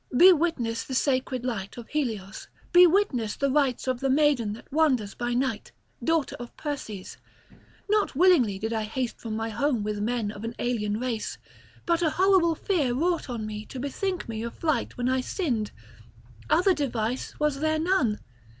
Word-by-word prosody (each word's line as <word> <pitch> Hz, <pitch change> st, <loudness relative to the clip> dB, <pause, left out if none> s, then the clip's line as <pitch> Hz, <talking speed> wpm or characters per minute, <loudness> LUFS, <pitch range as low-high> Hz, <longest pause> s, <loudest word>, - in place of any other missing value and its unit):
Be 370 Hz, +5 st, +9 dB
witness 280 Hz, -9 st, -1 dB
the 260 Hz, -, -5 dB
sacred 255 Hz, -2 st, 0 dB
light 205 Hz, -5 st, -4 dB
of 235 Hz, -2 st, -9 dB
Helios, 220 Hz, -9 st, -3 dB, 0.3 s
be 355 Hz, 0 st, +9 dB
witness 285 Hz, -, +1 dB
the 275 Hz, -1 st, 0 dB
rites 270 Hz, -3 st, +1 dB
of 255 Hz, -1 st, 0 dB
the 270 Hz, -, 0 dB
maiden 270 Hz, -6 st, +3 dB
that 230 Hz, -, -12 dB
wanders 260 Hz, -10 st, +2 dB
by 240 Hz, 0 st, -2 dB
night, 255 Hz, -3 st, -1 dB, 0.3 s
daughter 325 Hz, -3 st, +1 dB
of 240 Hz, 0 st, -9 dB
Perses. 245 Hz, -10 st, -5 dB, 0.7 s
Not 420 Hz, -7 st, +1 dB
willingly 280 Hz, -, +4 dB
did 220 Hz, +3 st, -3 dB
I 220 Hz, -, 0 dB
haste 235 Hz, +3 st, -3 dB
from 220 Hz, -2 st, -4 dB
my 225 Hz, +1 st, -2 dB
home 240 Hz, 0 st, 0 dB
with 210 Hz, 0 st, -2 dB
men 220 Hz, -1 st, -1 dB
of 205 Hz, 0 st, -9 dB
an 230 Hz, +1 st, -4 dB
alien 215 Hz, -3 st, -1 dB
race; 240 Hz, -3 st, -3 dB, 0.5 s
but 340 Hz, 0 st, +2 dB
a 330 Hz, -, +3 dB
horrible 365 Hz, -1 st, +3 dB
fear 295 Hz, -10 st, 0 dB
wrought 340 Hz, +2 st, 0 dB
on 230 Hz, -3 st, -3 dB
me 215 Hz, 0 st, -5 dB
to 260 Hz, -, -7 dB
bethink 360 Hz, +7 st, -3 dB
me 220 Hz, -1 st, -4 dB
of 235 Hz, 0 st, -5 dB
flight 310 Hz, -3 st, -1 dB
when 245 Hz, 0 st, -1 dB
I 260 Hz, 0 st, +2 dB
sinned; 250 Hz, -, -2 dB, 0.8 s
other 360 Hz, +5 st, +4 dB
device 245 Hz, -5 st, -2 dB
was 300 Hz, -2 st, +1 dB
there 315 Hz, +1 st, +1 dB
none. 310 Hz, -, +1 dB
255 Hz, 175 wpm, -26 LUFS, 225-310 Hz, 0.8 s, Be